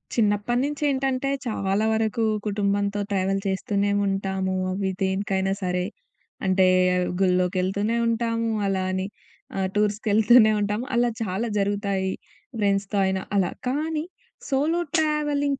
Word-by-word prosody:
చిన్నప్పటినుంచి 240 +7 +1
ఏంటంటే 270 0 0 0.2
చాలా 205 -2 0
వరకు 220 +1 0 0.2
కుటుంబంతో 200 0 0
ట్రావెల్ 195 0 +1
చేస్తూనే 200 +1 0 0.2
ఉంటాము. 190 -1 -1 0.2
అవి 190 +1 -1
దేనికైనా 190 0 0
సరే. 180 0 0 0.6
అంటే 190 0 +4 0.5
గుళ్ళో‌కెళ్తూనే 185 +4 +1
ఉంటాము. 230 0 0 0.2
అలా 195 -1 0
అని 185 0 -1 0.5
ఆహ్, 190 -1 +1
టూర్స్‌కెళ్తూనే 215 +2 +4
ఉంటాము. 210 +4 -1
అలా 240 0 +3
చాలా 210 +2 -1
జరుగుతాయి 200 -1 0 0.5
ఫ్రెండ్స్‌తో 200 0 0
అయినా 190 0 0 0.2
అలా. 185 -3 +2 0.2
కానీ 305 +4 -1 0.5
సోలో 295 +5 +1 0.2
ట్రావెలింగ్ 295 -3 +1
205 Hz, 110 wpm, -24 LUFS, 190-235 Hz, 0.6 s, అంటే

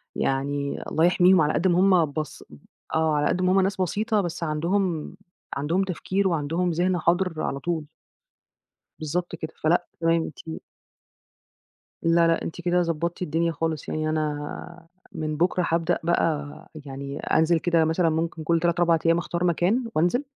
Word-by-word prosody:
يعني 140 +1 -1
الله 160 +2 +3
يحميهم 180 0 +5
على 150 0 +2
قد 180 - +1
ما 175 -1 +3
هُم 180 -5 +4
بس 155 -1 -5 0.5
آه، 160 -1 +2
على 150 0 +2
قد 185 - 0
ما 185 0 +2
هُم 190 +1 +4
ناس 190 0 -1
بسيطة 210 +4 0
بس 175 -2 -4
عندهم 170 +2 -1 0.4
عندهم 165 +7 0
تفكير 190 +1 -1
وعندهم 165 +1 0
ذهن 180 +2 +1
حاضر 175 -1 +1
على 140 - -2
طول. 160 0 -3 1.1
بالضبط 170 +3 -3
كده. 160 -1 -7
فلأ، 170 +3 +2
تمام 165 0 +2 0.2
أنتِ 160 - -5 1.4
لا، 165 0 +4
لأ 165 0 +2
أنتِ 170 - -6
كده 175 0 +2
ضبّطتِ 170 +1 -2
الدنيا 165 0 0
خالص. 160 -1 -3
يعني 155 0 -1
أنا 155 +2 -4 0.2
من 155 -1 -3
بُكرة 175 +2 +1
هابدأ 165 +1 +1
بقى، 155 -3 -1 0.2
يعني 140 +1 -6
أنزل 160 +1 +2
كده 165 -1 +2
مثلًا 165 +1 +2
ممكن 160 0 -2
كل 165 +1 +2
3 170 0 0
4 170 -1 +3
أيّام 165 0 +4
أختار 170 +1 -2
مكان 180 +8 +1
وأنزل، 175 - +2
165 Hz, 160 wpm, -25 LUFS, 155-180 Hz, 1.4 s, يحميهم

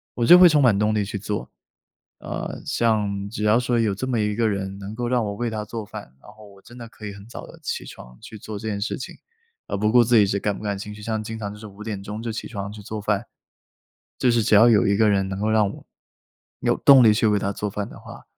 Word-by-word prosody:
我 120 - 0
就 175 +8 +9
会 180 -1 +9
充 150 -2 +3
满 120 -6 +4
动 105 +1 +1
力 105 -1 +1
去 100 - -5
做。 105 +1 -5 0.7
呃， - - -6
像 105 -4 0
只 105 - -4
要 105 +2 +4
说 120 -1 0
有 105 -4 +1
这 130 +7 -4
么 125 -3 0
一 105 -1 0
个 115 0 +1
人 100 -2 -3
能 100 +1 -8
够 120 +2 -3
让 120 -2 +1
我 100 - -3
为 120 +3 -3
她 110 -1 -4
做 115 +1 -6
饭， 85 -10 -10
然 - - -14
后 110 0 -16
我 100 -1 -18
真 120 - -15
的 120 -1 -8
可 110 - -12
以 100 - -6
很 100 0 -12
早 120 - -9
的 - - -14
起 - - -3
床 60 0 -13
去 110 - -10
做 105 0 -7
这 110 - -6
件 105 -2 -2
事 105 +6 -2
情， - - -8 0.5
而 - - -4
不 105 +2 +1
顾 120 +1 +6
自 120 +1 +2
己 105 -2 +6
是 100 +1 -1
感 105 0 -1
不 - - -10
感 100 -1 -2
兴 105 +2 -7
趣， 105 - -12
像 110 0 -3
经 110 +1 -6
常 100 -2 -4
就 105 - -10
是 110 - -10
5 105 0 -11
点 105 -3 -5
钟 105 +2 -6
就 115 0 -4
起 110 - -5
床 100 -3 -6
去 105 0 -10
做 105 +1 -6
饭。 105 +1 -1 0.9
就 125 - +3
是 115 -1 +2
只 110 - +2
要 110 +3 +7
有 105 -4 +4
一 100 - +2
个 110 0 +4
人 95 -1 +1
能 95 0 -5
够 110 +1 0
让 110 -2 +3
我 - - -12 0.7
有 - - +2
动 135 -2 +7
力 110 - +7
去 110 +1 +1
为 105 -1 +3
她 100 - -2
做 105 +1 -4
饭 100 0 -4
的 - - -12
话， - - -12
105 Hz, 300 characters per minute, -23 LUFS, 100-115 Hz, 0.9 s, 就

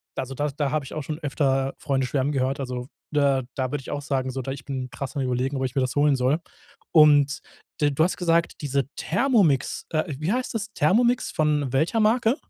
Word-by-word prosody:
also 135 +1 -4
da 145 +2 -1
da 145 0 -2
habe 155 -2 0
ich - - -9
auch 155 - -3
schon 150 +1 -5
öfter 135 -3 0
Freunde 135 -2 0
schwärmen 140 +2 0
gehört, 135 +1 0
also 125 -1 -4 0.2
da 140 -2 +2
da 130 -1 -2
würde 145 -2 -2
ich - - -10
auch 145 - -3
sagen, 130 -2 -1
so, 130 - -4
da 135 - -5
ich 135 -1 -7
bin 130 -2 -4
krass 135 0 -6
am 135 - -1
Überlegen, 130 +2 -1
ob 135 - -2
ich 125 - -4
mir 135 - +2
das 130 +1 -1
holen 145 -1 +4
soll. 130 +4 +2 0.5
Und 145 -2 +5 0.4
d 145 - +4
du 150 +3 +2
hast 180 - 0
gesagt: 170 -2 +1
„Diese 140 -1 0
Thermomix“, 195 - +1
äh, 155 -1 +1 0.2
wie 155 +6 -1
heißt 250 0 -1
das? 220 -1 -2
Thermomix 235 +10 +2
von 150 -4 0
welcher 160 - +2
Marke? 225 +2 +3
145 Hz, 220 wpm, -24 LUFS, 135-155 Hz, 0.5 s, Und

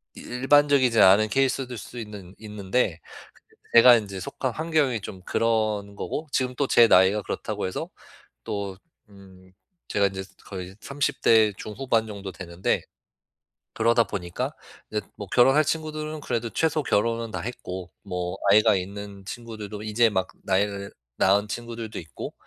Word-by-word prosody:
이 - - -10
일반적이지 135 -1 +3
않은 100 +3 +7
케이스들 130 0 0
수 120 - -10
있는 105 -4 -9
있는데. 105 -3 -1 0.4
근데 - - -3
제가 120 +1 +9
이제 100 -3 -5
속한 125 +7 -3
환경이 150 -6 0
좀 95 -1 -8
그런 110 -2 0
거고. 150 +8 -4
지금 125 -1 0
또 140 - +1
제 120 -2 +6
나이가 95 +2 +5
그렇다고 105 0 -4
해서 95 - -4 0.5
또 100 -2 -4 0.3
음. 95 -2 -17 0.4
제가 100 - +2
인제 95 -1 -5 0.2
거의 95 -1 -7
30 140 0 -2
대 110 -2 +5
중후반 115 0 -1
정도 100 -2 -7
되는데 85 0 -2 0.9
그러다 115 +1 +3
보니까 90 -4 -4 0.4
이제 105 0 -1
뭐 100 - -7
결혼할 135 +8 +5
친구들은 155 0 -3
그래도 115 -4 -2
최소 160 +4 +1
결혼은 115 -1 0
다 - - -4
했고 95 -6 -6
뭐 90 -1 -4
아이가 105 +2 +6
있는 100 +1 -6
친구들도 110 -2 -7
이제 110 +2 +3
막 95 -3 -1
나일 100 +1 0 0.3
낳은 100 +2 +3
친구들도 115 0 -5
있고. 80 -7 -8
105 Hz, 305 characters per minute, -25 LUFS, 100-120 Hz, 0.9 s, 제가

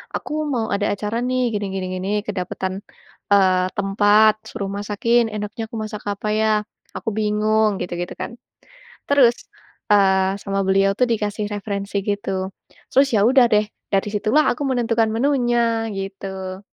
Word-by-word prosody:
"Aku 305 0 -3
mau 235 -5 -1
ada 205 +1 0
acara 210 +2 -3
nih 250 -2 0
gini, 205 -1 -2
gini, 190 -1 -3
gini, 185 +2 -4 0.2
kedapetan, 190 -1 -3 0.6
eee, 185 -2 +4
tempat, 205 +2 +4 0.2
suruh 200 - -4
masakin, 210 +4 +1
enaknya 215 +2 -5
aku 225 - -6
masak 215 -1 -6
apa 205 +1 -4
ya? 220 0 +2 0.5
Aku - - -3
bingung." 215 -1 +1
Gitu-gitu 175 0 -4
kan. - - -5 0.8
Terus, 260 -5 +5 0.6
eee, 190 -1 +3
sama 195 0 -2
beliau 195 +1 +3
tuh 250 - +5
dikasih 210 -1 -1
referensi 200 0 -3
gitu. 195 -2 -2 0.4
Terus 275 +1 +5
ya 200 - +4
udah 260 -1 +6
deh, 210 0 +4 0.3
dari 195 +1 +2
situlah 235 +8 +2
aku 250 +4 -3
menentukan 230 -3 +1
menunya, 235 -3 +1
gitu. 190 -1 -6
210 Hz, 145 wpm, -21 LUFS, 195-230 Hz, 0.8 s, udah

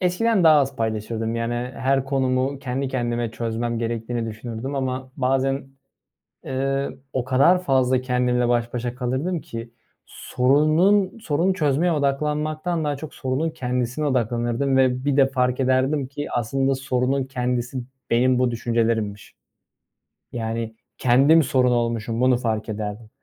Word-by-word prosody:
eskiden 185 +2 +2
daha 155 -2 +7
az 135 0 -2
paylaşırdım. 110 0 -2
Yani, 115 +1 -1 0.2
her 135 0 +1
konumu 135 0 0
kendi 135 0 -3
kendime 120 -3 -2
çözmem 115 +1 -3
gerektiğini 115 0 -3
düşünürdüm 115 +4 -5
ama 130 -1 -3
bazen, 135 +1 0 0.8
ııı, 135 +1 -2
o 130 -2 -1
kadar 140 +8 +4
fazla 130 -4 +2
kendimle 125 -1 +1
baş 120 0 0
başa 120 0 -3
kalırdım 135 +8 -2
ki 115 -2 -8 0.4
sorunun, 155 - +2
sorunu 185 -1 0
çözmeye 160 +1 +1
odaklanmaktan 150 +3 -1
daha 145 -1 -1
çok 150 +1 -9
sorunun 135 +5 -1
kendisine 125 0 -2
odaklanırdım 120 +1 0
ve 130 0 +2
bir 145 -1 +1
de 135 - +6
fark 125 -1 0
ederdim 130 +2 +1
ki 145 +2 -6
aslında 135 +3 0
sorunun 130 0 0
kendisi 125 -1 -2 0.3
benim 125 +2 +3
bu 125 -1 +2
düşüncelerimmiş. 115 -3 -1 1.0
Yani, 115 -1 -4 0.2
kendim 140 +6 +5
sorun 125 -1 +2
olmuşum, 115 0 -1
bunu 130 -1 +4
fark 110 -3 -2
ederdim 105 +1 -5
130 Hz, 130 wpm, -23 LUFS, 120-140 Hz, 1.0 s, daha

